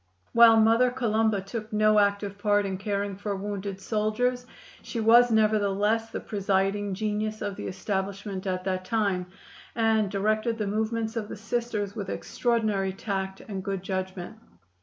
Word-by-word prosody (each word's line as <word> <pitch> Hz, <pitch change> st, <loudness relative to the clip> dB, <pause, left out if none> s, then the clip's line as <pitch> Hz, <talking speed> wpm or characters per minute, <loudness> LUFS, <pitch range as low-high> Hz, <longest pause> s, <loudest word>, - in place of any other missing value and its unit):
While 230 Hz, -1 st, +8 dB
Mother 225 Hz, +3 st, +5 dB
Columba 220 Hz, -4 st, +1 dB
took 215 Hz, +3 st, -6 dB
no 215 Hz, 0 st, +4 dB
active 200 Hz, 0 st, 0 dB
part 205 Hz, -1 st, +2 dB
in 190 Hz, -1 st, -3 dB
caring 200 Hz, -1 st, -2 dB
for 205 Hz, 0 st, -3 dB
wounded 200 Hz, 0 st, -4 dB
soldiers, 235 Hz, +5 st, -1 dB, 0.3 s
she 235 Hz, -, -5 dB
was 235 Hz, +2 st, +6 dB
nevertheless 215 Hz, 0 st, +2 dB
the -, -, -4 dB
presiding 200 Hz, -1 st, 0 dB
genius 215 Hz, +1 st, -2 dB
of 205 Hz, -2 st, -3 dB
the -, -, -6 dB
establishment 195 Hz, 0 st, -3 dB
at 185 Hz, -1 st, -2 dB
that 185 Hz, -1 st, -2 dB
time, 200 Hz, -4 st, 0 dB, 0.5 s
and 220 Hz, -2 st, +2 dB
directed 215 Hz, +3 st, 0 dB
the 215 Hz, -, -1 dB
movements 220 Hz, +2 st, -1 dB
of 215 Hz, -2 st, -3 dB
the -, -, -6 dB
Sisters 220 Hz, -2 st, -3 dB
with 200 Hz, -3 st, -5 dB
extraordinary 215 Hz, -5 st, 0 dB
tact 190 Hz, -1 st, -4 dB
and 195 Hz, -3 st, -6 dB
good 195 Hz, -2 st, -3 dB
judgment. 185 Hz, +2 st, -4 dB
210 Hz, 150 wpm, -27 LUFS, 195-220 Hz, 0.5 s, While